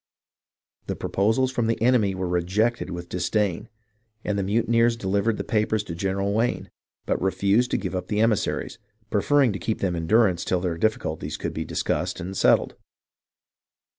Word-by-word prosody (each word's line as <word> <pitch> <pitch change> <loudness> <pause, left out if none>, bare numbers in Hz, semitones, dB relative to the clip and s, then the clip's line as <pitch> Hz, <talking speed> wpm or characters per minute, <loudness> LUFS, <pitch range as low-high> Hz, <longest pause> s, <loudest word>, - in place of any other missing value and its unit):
The - - -2
proposals 110 +6 +1
from 120 -3 0
the 115 - 0
enemy 115 -5 +3
were 95 -1 -2
rejected 95 +6 0
with 85 -1 -6
dis 90 0 -2
dain, 105 -6 0 0.5
and 105 - -1
the 100 - 0
mutineers 115 +3 +2
delivered 100 +1 0
the - - -3
papers 110 -1 0
to 90 - -7
General 95 +3 -1
Wayne, 115 +3 -1 0.3
but - - -1
refused 100 +5 +2
to - - +1
give 95 - -4
up 90 -1 -3
the 105 - -1
emissaries, 110 -2 0 0.3
preferring 130 +3 +3
to 95 - -5
keep 110 +5 -2
them 90 -3 -1
in 80 -1 -3
durance 100 -5 +3
till 90 - 0
their 90 -2 -1
difficulties 85 -6 -1
could - - -4
be - - -4
discussed - - -2
and 95 +2 -5
settled. - - +3
100 Hz, 170 wpm, -24 LUFS, 95-115 Hz, 0.5 s, enemy